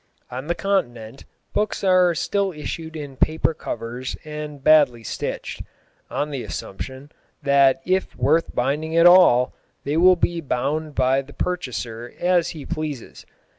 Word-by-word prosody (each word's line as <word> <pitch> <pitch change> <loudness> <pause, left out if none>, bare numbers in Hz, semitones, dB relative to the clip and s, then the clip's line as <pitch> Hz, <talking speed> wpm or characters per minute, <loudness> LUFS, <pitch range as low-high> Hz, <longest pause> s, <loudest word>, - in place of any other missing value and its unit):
On 130 +4 -6
the 170 - 0
Continent 120 - -2 0.3
books 210 0 -1
are 185 -2 +4
still 200 +3 0
issued 160 +1 -6
in 145 -3 -7
paper 160 +3 +1
covers 125 -2 -5
and 150 -2 -7
badly 145 -7 +5
stitched, - - -5 0.5
on 150 +1 -2
the 135 -3 -3
assumption 130 +9 -7 0.3
that 140 +1 +4
if 185 +1 0
worth 155 +6 +1
binding 150 +6 -1
at 170 - +6
all, 175 -9 +6 0.3
they 145 +3 -1
will 185 +2 +6
be 170 -1 -1
bound 145 +2 -2
by 130 +1 +2
the 140 +1 -14
purchaser 120 -9 -4
as 175 -1 +2
he 150 -4 -8
pleases. 150 -6 -6
150 Hz, 140 wpm, -22 LUFS, 130-170 Hz, 0.5 s, at